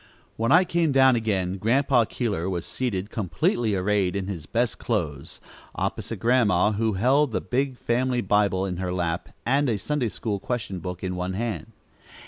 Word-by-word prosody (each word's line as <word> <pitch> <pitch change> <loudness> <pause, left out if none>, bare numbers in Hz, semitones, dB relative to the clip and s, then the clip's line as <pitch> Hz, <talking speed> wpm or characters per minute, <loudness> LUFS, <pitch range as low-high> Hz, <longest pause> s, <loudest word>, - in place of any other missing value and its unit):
When 115 +1 0
I 180 +3 +7
came 170 -3 +1
down 130 -1 +5
again, 95 -5 -1
Grandpa 125 +2 +3
Keeler 100 -7 -2
was 90 -3 -3
seated, 105 -6 -3
completely 110 +2 0
arrayed 95 0 +1
in 100 -1 -2
his 85 -6 -6
best 120 0 0
clothes, 80 - -3 0.4
opposite - - -3
Grandma, 115 -5 +3
who 110 +1 0
held 130 +6 +2
the - - +1
big 130 0 -1
family 125 +1 0
Bible 100 -2 +2
in 90 -2 -3
her 90 0 -2
lap, 85 -1 -2 0.2
and 135 +2 +2
a 110 - +1
Sunday 130 +3 -1
school 105 -1 -3
question 110 -5 -3
book 90 +1 -6
in 90 -1 -2
one 90 +1 -3
hand. 110 +3 -3
105 Hz, 170 wpm, -25 LUFS, 95-125 Hz, 0.4 s, I